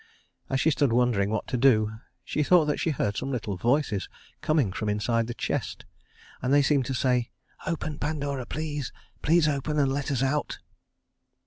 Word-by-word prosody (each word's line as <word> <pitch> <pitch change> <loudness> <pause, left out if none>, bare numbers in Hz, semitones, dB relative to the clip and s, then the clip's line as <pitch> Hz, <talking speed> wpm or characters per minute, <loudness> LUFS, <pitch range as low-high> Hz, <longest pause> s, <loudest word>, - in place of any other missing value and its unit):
As 135 - 0
she 160 - +3
stood 140 -2 +2
wondering 115 -5 +2
what 110 0 -1
to 125 - 0
do, 110 -4 +4 0.3
she - - -1
thought 165 +1 +5
that 150 -1 -1
she - - 0
heard 105 -8 -1
some 135 - -3
little 110 -6 -2
voices 120 0 0 0.3
coming 145 - +1
from 105 +2 -2
inside 115 +2 0
the 120 - -5
chest, - - -3 0.6
and 125 - -1
they 145 0 +5
seemed 140 -2 +2
to 135 - -2
say: 125 -2 +1 0.4
"Open, 155 -2 -3
Pandora, 145 -4 -2
please, 150 -3 -4 0.3
please 165 0 +4
open 150 +1 -1
and 135 -2 +2
let 140 0 -2
us 135 -2 0
out." 145 +2 -1
135 Hz, 180 wpm, -27 LUFS, 115-150 Hz, 0.6 s, thought